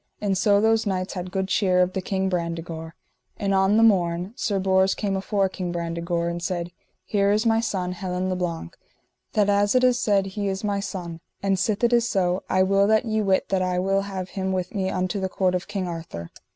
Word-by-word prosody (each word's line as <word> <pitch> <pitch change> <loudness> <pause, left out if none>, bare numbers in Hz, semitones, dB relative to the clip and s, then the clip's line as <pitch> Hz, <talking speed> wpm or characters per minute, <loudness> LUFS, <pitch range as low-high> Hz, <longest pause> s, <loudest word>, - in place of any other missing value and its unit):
And 200 -2 0
so 200 +1 +3
those 225 +1 +2
knights 185 -1 -2
had 180 -1 -5
good 190 0 -2
cheer 185 -2 +2
of 180 0 +2
the 190 - -2
King 190 0 -1
Brandegore. 170 -2 -4 0.4
And 200 -1 0
on 195 +2 +3
the 225 - +5
morn 180 -2 +2
Sir 205 -5 -1
Bors 190 0 +2
came 200 -2 -1
afore 195 0 0
King 185 -2 -4
Brandegore 170 0 -2
and 170 0 -3
said: 175 -1 -3 0.3
Here 200 -1 +2
is 215 +3 +1
my 225 -1 +3
son 190 -5 -2
Helin 180 0 -3
le 185 - -1
Blank, 170 - -4 0.6
that 210 -2 +3
as 205 +2 +2
it 255 - +4
is 250 -1 +4
said 200 -2 +2
he 200 +1 -3
is 195 +1 -3
my 205 -1 0
son; 175 -4 -5 0.2
and 195 -1 +1
sith 205 +2 0
it 235 0 +4
is 235 0 +3
so, 180 -2 +1
I 185 0 +3
will 195 +1 +3
that 220 +3 +3
ye 220 -1 0
wit 195 -2 +1
that 190 -1 +1
I 180 -1 0
will 195 +2 +1
have 190 -2 -5
him 190 -1 -3
with 185 +1 -2
me 190 -3 -1
unto 185 +2 -1
the 190 0 -2
court 185 -1 +1
of 180 0 -2
King 200 -3 -3
Arthur. 160 - -7
190 Hz, 225 wpm, -24 LUFS, 180-200 Hz, 0.6 s, the